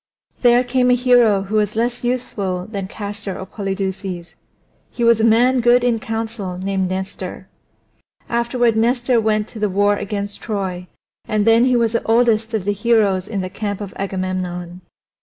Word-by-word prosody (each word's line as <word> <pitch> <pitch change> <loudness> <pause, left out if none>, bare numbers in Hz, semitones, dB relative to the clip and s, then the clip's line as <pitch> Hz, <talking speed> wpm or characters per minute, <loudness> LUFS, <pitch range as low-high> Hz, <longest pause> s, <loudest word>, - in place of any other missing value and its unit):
There 245 0 +5
came 250 0 +1
a 250 - +5
hero 240 -5 +4
who 210 +3 -2
was 210 0 0
less 240 +2 -1
youthful 200 -7 -2
than 200 -3 -5
Castor 205 -1 -6
or 190 - -6
Polydeuces; 190 -3 -4 0.6
he 240 - -4
was 230 -1 +4
a - - +1
man 240 +3 +4
good 240 +1 +4
in 240 -2 +1
council 225 -5 -4
named 190 0 -1
Nestor. 190 +1 -5 0.8
Afterward 235 0 +1
Nestor 240 +1 +2
went 215 -1 0
to 225 - -9
the 210 -1 +1
war 205 +2 +2
against 205 0 -4
Troy, 190 -4 -4 0.4
and 215 -1 0
then 230 +2 +5
he 255 -1 +3
was 230 -2 +2
the 230 - +1
oldest 225 -1 +2
of 200 -4 -2
the 205 - +1
heroes 205 -3 +2
in 200 -3 -3
the 185 - -4
camp 205 -1 -4
of 205 -2 -7
Agamemnon. 185 -2 -4
215 Hz, 170 wpm, -19 LUFS, 195-235 Hz, 0.8 s, There